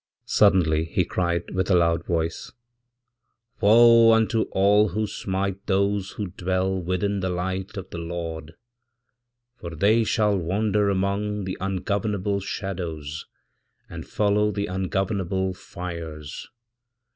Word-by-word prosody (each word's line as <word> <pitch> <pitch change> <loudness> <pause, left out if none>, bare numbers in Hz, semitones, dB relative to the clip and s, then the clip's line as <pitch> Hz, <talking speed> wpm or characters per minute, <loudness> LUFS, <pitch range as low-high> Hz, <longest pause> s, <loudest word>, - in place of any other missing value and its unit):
Suddenly 80 -6 +3
hecried 85 -1 -1
with 95 +1 -1
a 95 - +4
loud 85 -1 +2
voice, 80 -1 -2 1.1
'Woe 115 +2 +7
unto 110 0 +2
all 105 +2 +4
who 110 +4 -1
smite 100 -1 -3
those 100 0 0
who 100 -4 -5
dwellwithin 95 +2 -1
the 95 - -1
Light 95 +3 -3
of 95 -1 -7
the 85 - -5
Lord, 85 -1 -6 1.0
for 85 -1 -7
they 105 +7 +3
shall 105 -2 +2
wander 100 +3 +1
among 100 +1 -1
theungovernable 100 +2 -2
shadows, 85 -7 -5 0.6
and - - -8
follow 105 0 +1
the 100 -1 -2
ungovernable 95 0 -1
fires!' 85 -5 -8
95 Hz, 110 wpm, -24 LUFS, 85-100 Hz, 1.1 s, Woe